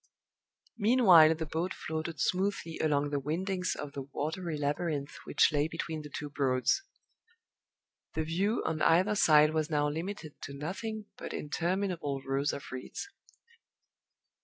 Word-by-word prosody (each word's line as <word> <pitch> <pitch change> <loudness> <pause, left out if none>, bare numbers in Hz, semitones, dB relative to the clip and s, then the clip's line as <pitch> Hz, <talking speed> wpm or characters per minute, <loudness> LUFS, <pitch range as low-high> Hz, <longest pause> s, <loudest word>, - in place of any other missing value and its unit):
Meanwhile 195 -9 +7
the 160 0 -4
boat 165 +4 -2
floated 160 -1 -4
smoothly 185 -1 -1
along 145 -2 +1
the 145 - 0
windings 180 +6 -1
of 145 - -6
the 140 - -5
watery 155 +4 -4
labyrinth 145 0 -2
which - - +4
lay 145 +1 +2
between 160 -1 -4
the 150 - -9
two 145 +1 -5
Broads. 135 - +1 1.3
The 160 - 0
view 190 +8 0
on 155 -1 -1
either 185 +7 +4
side 155 -5 +5
was 155 -1 0
now 150 -1 +2
limited 160 0 -5
to 140 - -7
nothing 210 +8 -4
but - - -6
interminable 170 -3 -2
rows 135 +2 0
of 140 - -6
reeds. 130 - -6
160 Hz, 135 wpm, -31 LUFS, 145-180 Hz, 1.3 s, Meanwhile